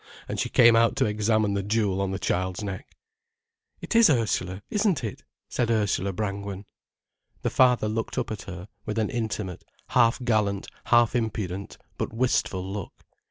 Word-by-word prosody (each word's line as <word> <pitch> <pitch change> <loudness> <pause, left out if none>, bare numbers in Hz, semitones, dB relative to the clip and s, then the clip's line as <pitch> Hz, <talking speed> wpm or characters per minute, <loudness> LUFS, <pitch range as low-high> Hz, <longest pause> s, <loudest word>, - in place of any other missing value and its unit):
And - - -4
she - - 0
came 115 -1 +6
out 115 0 +4
to - - +2
examine 105 0 +1
the 100 - 0
jewel 100 -2 0
on 100 - 0
the 95 - -2
child's 95 +1 -1
neck. 95 -2 -7 0.8
"It - - -4
is 230 -4 +7
Ursula, 100 -7 0
isn't 205 - +1
it?" 110 - -5 0.3
said 120 -2 -1
Ursula 105 -3 +1
Brangwen. 100 0 -4 0.8
The - - 0
father 125 -4 +4
looked 110 +1 -3
up - - -1
at 105 - -4
her, 90 0 -8 0.2
with 105 +1 -4
an 110 -1 0
intimate, 110 -6 -3 0.3
half 120 0 +4
gallant, 105 -4 +1 0.2
half 120 +1 +4
impudent, 105 -5 -3 0.2
but - - -2
wistful 105 -6 0
look. 100 -1 -7
105 Hz, 160 wpm, -26 LUFS, 100-115 Hz, 0.8 s, is